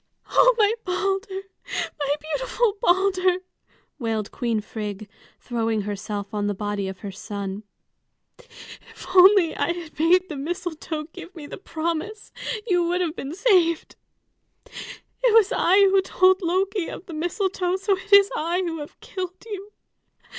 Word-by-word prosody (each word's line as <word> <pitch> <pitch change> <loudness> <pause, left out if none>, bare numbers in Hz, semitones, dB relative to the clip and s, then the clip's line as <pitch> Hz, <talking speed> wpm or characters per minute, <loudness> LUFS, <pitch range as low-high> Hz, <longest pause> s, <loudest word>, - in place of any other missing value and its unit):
"Oh, - - +6
my 425 -1 +4
Balder, 385 +1 -2 0.6
my 285 0 +1
beautiful 440 +7 -1
Balder!" 370 0 +3 0.6
wailed 220 -4 -2
Queen 235 -3 -1
Frigg, 210 -1 -6 0.3
throwing 225 -3 -1
herself 205 +1 -5
on 205 -1 -1
the 205 - -1
body 205 -1 -2
of 190 -1 -7
her 200 - -5
son. 200 0 -5 0.8
"If 485 -1 -14
I - - -7
had - - -8
only 350 -3 +4
made 360 +3 +4
the 305 - -6
mistletoe 320 0 -4
give 360 +1 -10
me 310 -3 -8
the 290 - -9
promise, 340 +4 -4 0.3
you 360 -6 +2
would 355 +1 0
have 335 -2 -1
been 285 +1 -5
saved. 360 -6 +2 0.7
It - - -3
was 440 -1 +6
I 375 -4 +3
who 390 -1 +5
told 375 0 +3
Loki 375 +1 0
of - - -8
the 340 - -9
mistletoe, 360 +2 -1
so 390 +1 +1
it 385 +2 -12
is 400 0 +7
I 340 +4 0
who 330 -2 -3
have 295 - -9
killed 370 -2 -5
you. 410 -2 -7
350 Hz, 145 wpm, -24 LUFS, 270-390 Hz, 0.8 s, is